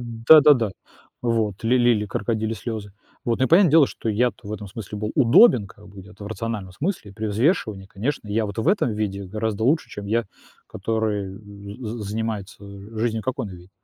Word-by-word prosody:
Н 115 -1 -8
да-да-да. 145 -8 +7 0.5
Вот. 115 -5 -1
Ли 125 +2 +3
лили 120 -3 +3
крокодильи 110 +2 -2
слёзы. 110 -3 -6 0.3
Вот, 115 -1 0
ну 130 - +3
и - - -7
понятное 175 0 +6
дело, 155 -1 +6
что 115 - -6
я-то 110 0 0
в - - -5
этом 105 -1 -6
смысле 105 +1 -7
был 105 +1 -3
удобен 120 - +6
как 105 +1 -16
бы, 100 0 -12
где-то, 100 +1 -12
в - - -7
рациональном 105 -2 -5
смысле, 140 - -4
при 110 +1 -4
взвешивании, 110 - 0
конечно, 110 +6 -4
я 110 +1 0
вот 100 +2 -7
в 110 - -1
этом 195 - +2
виде 100 -2 -3
гораздо 110 +2 -3
лучше, 150 +6 +2
чем 100 -1 -8
я, 115 +3 +1 0.4
который, 110 0 -2
э, - - -11 0.5
з 115 +3 -5
занимается, 105 -1 -4
э, 100 +2 -10
жизнью, 110 -1 -1
как 130 +3 -3
он 110 - -3
видит. 90 0 -12
110 Hz, 200 wpm, -23 LUFS, 100-120 Hz, 0.5 s, да-да-да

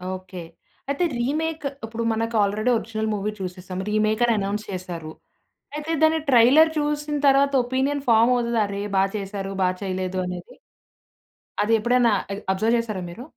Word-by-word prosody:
Okay. 185 -2 -9 0.5
అయితే 315 +6 +1
remake 310 +4 -2 0.2
ఇప్పుడు 230 +1 -4
మనకు 225 +1 -2
ఆల్రెడీ 215 +4 0
ఒరిజినల్ 220 -1 -3
మూవీ 205 +1 -2
చూసేసాం 185 0 -6
రీమేకని 215 +2 +2
అనౌన్స్ 205 +2 -2
చేసారు. 175 -4 -6 0.6
అయితే 300 +2 -4
దాన్ని 315 0 +4
ట్రైలర్ 265 +6 +6
చూసిన 295 0 -1
తరువాత 275 +1 +4
ఒపీనియన్ 270 +3 0
ఫామోవుతది. 235 +1 +3
"అరె! 200 0 -4
బా 190 - +4
చేసారు, 195 -1 -5
బా 180 - +3
చేయలేదు 185 -1 -3
అనేది" 180 -1 -7 1.1
అది 225 +2 +1
ఎప్పుడైనా 240 0 +3 0.2
అద్ 200 - -5
అబ్జర్వ్ 220 +5 +1
చేసారా 215 -5 -3
మీరు? 230 +8 -9
225 Hz, 140 wpm, -23 LUFS, 195-260 Hz, 1.1 s, ట్రైలర్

